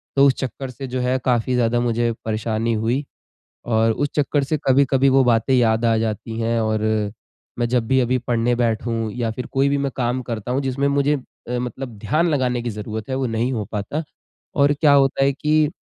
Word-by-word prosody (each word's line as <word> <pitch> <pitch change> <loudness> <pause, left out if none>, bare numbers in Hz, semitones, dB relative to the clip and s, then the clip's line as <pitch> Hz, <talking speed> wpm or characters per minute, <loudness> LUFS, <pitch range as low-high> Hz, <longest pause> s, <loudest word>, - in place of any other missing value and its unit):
तो 140 0 +6
उस 135 - +4
चक्कर 130 0 -5
से 130 +2 -7
जो 130 0 -3
है 125 +1 +1
काफ़ी 125 0 +1
ज़्यादा 120 -1 +2
मुझे 120 0 +1
परेशानी 110 +1 -1
हुई 115 +6 0 0.6
और 115 -1 +2
उस 145 +6 -1
चक्कर 145 -1 +1
से 155 +3 -1
कभी-कभी 135 0 +4
वो 135 0 +5
बातें 120 +1 +2
याद 115 -2 +3
आ 115 -1 +3
जाती 110 0 -3
है 115 0 0
और 110 0 0 0.8
मैं 120 -1 0
जब 120 -2 +1
भी 130 0 +3
अभी 125 +1 +1
पढ़ने 120 0 0
बैठूँ 115 -1 -1
या 115 0 -2
फिर 125 +3 -5
कोई 135 +1 +2
भी 140 0 +1
मैं 140 0 -1
काम 125 0 -1
करता 115 -1 -4
हूँ 130 - +1
जिसमें 135 +1 0
मुझे 140 +1 +2
अ, 125 -2 -7
मतलब 125 -1 -5
ध्यान 155 +12 +1
लगाने 125 -5 0
की 120 - -3
ज़रूरत 105 +1 -6
है - - 0
वो 135 -1 0
नहीं 115 +2 -1
हो 110 -4 -2
पाता। 105 +9 -3 0.5
और 145 0 +4
क्या 150 -3 +5
होता 135 -1 +3
है 140 - +3
कि 150 +2 +1
125 Hz, 210 wpm, -21 LUFS, 115-135 Hz, 0.8 s, तो